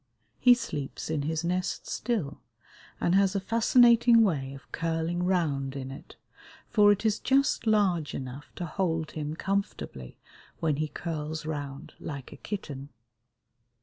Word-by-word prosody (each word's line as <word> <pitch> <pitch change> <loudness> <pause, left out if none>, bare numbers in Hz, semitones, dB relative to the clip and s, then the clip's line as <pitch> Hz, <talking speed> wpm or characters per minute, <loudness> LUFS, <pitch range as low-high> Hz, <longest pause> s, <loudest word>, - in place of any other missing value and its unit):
He 245 -1 +7
sleeps 150 - -5
in 155 -2 0
his 160 +3 -2
nest 180 +2 -1
still, 190 - -2 0.6
and 175 - +1
has 195 0 +4
a - - +2
fascinating 230 +2 +5
way 140 -9 -1
of 135 - -15
curling 165 +1 -1
round 150 -7 0
in 135 -1 -5
it, 135 - -11 0.6
for 205 -2 +6
it 205 +2 0
is 215 -1 +2
just 270 -3 +2
large 190 -8 +2
enough 130 +2 -7
to 175 - -4
hold 165 -2 -1
him 150 0 -4
comfortably 190 - -3 0.4
when 155 -3 +1
he 155 +1 0
curls 155 -1 -4
round 145 -2 -5
like 140 -4 -7
a - - -12
kitten. 145 -9 -6
165 Hz, 145 wpm, -28 LUFS, 145-200 Hz, 0.6 s, He